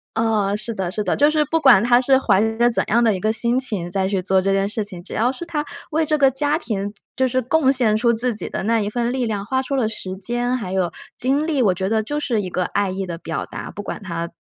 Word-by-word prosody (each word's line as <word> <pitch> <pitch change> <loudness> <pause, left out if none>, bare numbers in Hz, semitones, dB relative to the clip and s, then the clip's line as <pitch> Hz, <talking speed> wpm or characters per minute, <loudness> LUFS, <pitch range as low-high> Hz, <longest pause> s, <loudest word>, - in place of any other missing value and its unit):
呃， 215 -3 +1
是 225 +2 -5
的， 185 -3 -3
是 210 +2 -2
的， 185 - 0
就 290 +1 +4
是 305 -1 +2
不 325 +3 0
管 245 -8 +6
她 240 0 +5
是 265 +1 +3
怀 190 - +3 0.2
着 240 - +5
怎 235 - +1
样 235 +2 +3
的 220 -3 +3
一 - - -4
个 215 +4 0
心 235 +3 0
情 205 -9 -2
在 190 +1 0
去 195 -2 -1
做 190 +1 +2
这 195 +1 +1
件 195 0 +1
事 215 0 -2
情， 180 -4 -9
只 - - -8
要 240 +3 +2
是 270 +5 -8
她 315 -3 -3 0.2
为 315 +1 +1
这 305 0 0
个 275 -1 +6
家 290 +3 +1
庭 205 - -3 0.2
就 260 0 +2
是 255 +1 0
贡 270 +2 +2
献 225 -5 +3
出 235 +1 +2
自 235 0 0
己 - - -3
的 - - -4
那 225 +3 +1
一 205 - -1
份 240 +1 -1
力 255 -1 -1
量， 210 -3 -2
花 260 +5 -1
出 275 +1 -3
了 240 -5 +1
时 190 -4 -5
间， 240 +5 -1
还 205 -7 -4
有 185 -3 0 0.3
精 280 +5 +1
力， 285 -5 +1
我 190 -4 +3
觉 190 +2 -2
得 220 0 +1
就 295 +7 -3
是 235 -8 -1
一 185 - -4
个 180 - 0
爱 200 +1 -1
意 190 0 -4
的 170 - -5
表 165 -1 -5
达， - - -7
不 205 - -7
管 205 - -6
她 170 -2 -4
225 Hz, 305 characters per minute, -21 LUFS, 195-260 Hz, 0.3 s, 管